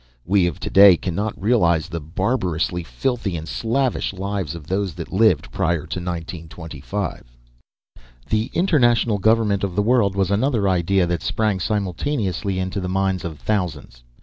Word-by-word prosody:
We 95 -1 +3
of 85 - -4
to - - -4
day 95 -2 +8
cannot 95 +5 -3
realize 85 -8 +2
the 85 -3 -4
barbarously 90 - -1
filthy 110 0 -2
and 80 +1 -7
slavish 120 +1 -1
lives 95 -4 -3
of 80 -3 -9
those 95 0 -2
that 85 0 -7
lived 110 +3 +3
prior 85 -4 0
to 85 +3 -4
1925. 85 +1 -5 1.0
The 110 +1 0
international 120 - +3
government 110 -2 +2
of 95 -3 -2
the 105 - +2
world 110 -4 +2
was 95 -1 +1
another 110 -1 +1
idea 95 0 +2
that 85 -1 -2
sprang 105 -3 0
simultaneously 100 - -2
into 95 +2 -2
the 90 -1 -3
minds 95 0 0
of 80 -4 -5
thousands. 75 - -3
95 Hz, 150 wpm, -21 LUFS, 85-105 Hz, 1.0 s, day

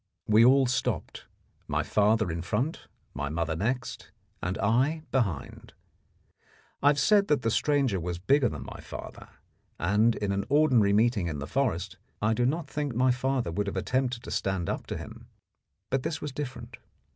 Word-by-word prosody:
We 110 +2 +5
all 135 +2 +6
stopped, 125 -7 -2 0.4
my - - 0
father 105 -2 +2
in 85 0 -3
front, 110 - -2 0.3
my 70 - -3
mother 80 +1 -1
next, 125 +9 -3 0.3
and 90 +2 -2
I 130 +10 +1
behind. 100 - -2 1.1
I 140 - +3
have 145 0 +5
said 200 +7 +4
that 145 -4 +1
the 115 - +1
stranger 135 -6 +1
was 85 0 -3
bigger 125 +7 +3
than - - -7
my - - -9
father, - - -9 0.5
and 105 +7 +3
in 100 -1 -2
an 100 0 -1
ordinary 135 -8 +4
meeting 105 -3 +2
in 75 -3 -3
the 70 - -5
forest 115 - -1 0.2
I 110 +1 +2
do 120 +2 +1
not 155 +3 -1
think 145 -5 -3
my 130 +1 +4
father 125 -5 -1
would 100 +4 -2
have 100 - -3
attempted 125 +3 -1
to - - -8
stand 95 -3 -1
up - - -5
to - - -4
him; - - -10 0.6
but 135 0 +1
this 155 - -3
was 150 - -5
different. 130 -4 -6
120 Hz, 175 wpm, -28 LUFS, 100-135 Hz, 1.1 s, all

